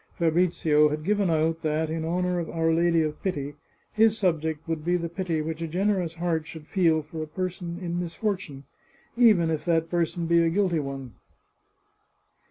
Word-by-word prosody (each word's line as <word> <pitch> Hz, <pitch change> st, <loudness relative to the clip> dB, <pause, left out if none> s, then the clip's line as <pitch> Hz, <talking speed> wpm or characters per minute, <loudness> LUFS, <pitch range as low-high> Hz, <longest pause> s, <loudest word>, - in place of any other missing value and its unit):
Fabrizio 165 Hz, -3 st, +3 dB
had 150 Hz, +1 st, -3 dB
given 200 Hz, +1 st, +1 dB
out 160 Hz, 0 st, +1 dB
that, 155 Hz, +1 st, 0 dB
in 160 Hz, 0 st, -2 dB
honour 180 Hz, +2 st, 0 dB
of 170 Hz, -, -4 dB
Our 165 Hz, 0 st, +1 dB
Lady 170 Hz, 0 st, +3 dB
of 155 Hz, -1 st, -4 dB
Pity, 145 Hz, -7 st, -3 dB, 0.4 s
his 220 Hz, 0 st, +4 dB
subject 160 Hz, -5 st, -1 dB
would 160 Hz, -2 st, -2 dB
be 175 Hz, +2 st, +2 dB
the 170 Hz, -1 st, -4 dB
pity 170 Hz, -3 st, -2 dB
which 160 Hz, +1 st, -4 dB
a 165 Hz, -, -2 dB
generous 180 Hz, -1 st, 0 dB
heart 165 Hz, -2 st, -1 dB
should 160 Hz, -2 st, -9 dB
feel 165 Hz, -3 st, +2 dB
for 155 Hz, +2 st, -7 dB
a 155 Hz, -, -4 dB
person 175 Hz, +1 st, -4 dB
in 175 Hz, -2 st, -3 dB
misfor 185 Hz, +4 st, -1 dB
tune, 140 Hz, -7 st, -10 dB, 0.5 s
even 210 Hz, -9 st, +5 dB
if 155 Hz, -, -2 dB
that 165 Hz, -1 st, +1 dB
person 170 Hz, 0 st, 0 dB
be 170 Hz, 0 st, +4 dB
a 165 Hz, -, +3 dB
guilty 180 Hz, -2 st, +1 dB
one. 135 Hz, -4 st, -6 dB
165 Hz, 180 wpm, -26 LUFS, 160-180 Hz, 0.5 s, even